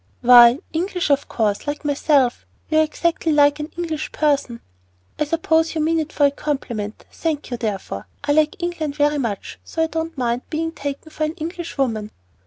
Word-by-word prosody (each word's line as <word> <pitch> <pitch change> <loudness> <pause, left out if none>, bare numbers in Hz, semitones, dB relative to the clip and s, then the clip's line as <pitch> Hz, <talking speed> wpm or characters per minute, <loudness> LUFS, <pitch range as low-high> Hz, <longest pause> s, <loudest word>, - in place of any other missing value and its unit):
"Why, 240 0 +8 0.2
English 355 -1 -1
of 280 0 +2
course, 215 +2 -1
like 295 +1 -4
myself. 280 -3 +2 0.2
You 315 - +4
are - - +6
exactly 325 +1 0
like 290 0 +4
an 300 +2 -5
English 320 -3 -3
person." 280 -6 0 0.6
"I 300 - +2
suppose 325 +1 +1
you 315 - 0
mean 325 +1 +2
it 315 -1 -3
for 290 - +3
a 280 - +4
compliment; 240 -8 -4
thank 310 -5 -3
you, 245 - -2
therefore. 195 - -4 0.2
I 290 - 0
like 305 +1 +3
England 320 -4 -2
very 295 0 +2
much, 225 -6 -4
so 325 - -2
I - - +3
don't 325 0 -4
mind 240 -1 0
being 325 +1 -2
taken 285 0 -6
for 310 - -1
an 310 - -3
English 335 0 -6
woman." 220 -6 -1
295 Hz, 190 wpm, -21 LUFS, 255-320 Hz, 0.6 s, Why